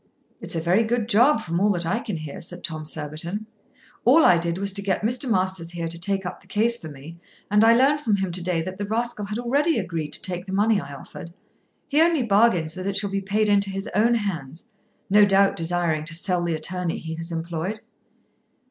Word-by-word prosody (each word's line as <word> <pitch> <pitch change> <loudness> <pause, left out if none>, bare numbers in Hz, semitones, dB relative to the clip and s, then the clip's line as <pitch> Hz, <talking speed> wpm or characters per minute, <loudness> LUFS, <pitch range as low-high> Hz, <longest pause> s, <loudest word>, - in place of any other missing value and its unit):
"It's - - -4
a - - 0
very 175 +6 +3
good 230 0 -1
job 240 +3 +4
from 170 -3 -2
all 205 +2 +3
that 175 -2 -2
I 190 +7 0
can 210 -7 -4
hear," 155 -2 -7
said 175 +1 -7
Tom 155 -1 -5
Surbiton. 160 +7 -4 0.6
"All 285 +7 +6
I 175 -2 +6
did 170 0 -2
was 200 0 -1
to 200 - -1
get 200 0 -1
Mr. 245 +4 0
Masters 185 -4 +1
here 170 -1 -3
to 165 +1 -5
take 195 +1 -1
up 180 - -6
the 195 - -23
case 225 +4 +2
for 160 -9 -8
me, 150 +4 -11 0.3
and 210 +1 +5
I 230 +1 +6
learned 280 +4 +3
from 220 -7 +1
him 190 -2 -2
to 180 +1 -3
day 175 -2 0
that 185 +3 -7
the 205 - -2
rascal 225 -1 -2
had 210 +2 -4
already 285 +7 +1
agreed 165 -7 -3
to - - 0
take 180 0 -3
the 190 - -5
money 205 0 +2
I - - -9
offered. 165 +4 -10 0.6
He 300 +2 +2
only 330 -5 +3
bargains 200 -7 +3
that 185 +1 -5
it 200 0 -1
shall 200 0 0
be 195 0 -1
paid 210 +2 0
into 200 -1 +3
his 195 0 -4
own 230 +3 +3
hands, 175 - -3 0.4
no 205 +1 +6
doubt 195 0 +4
desiring 165 -2 0
to 165 +1 -3
sell 175 +1 +2
the 170 -1 -1
attorney 175 +2 -3
he 160 0 -6
has 165 +1 -4
employed." 170 +5 -4
190 Hz, 230 wpm, -24 LUFS, 170-215 Hz, 0.6 s, All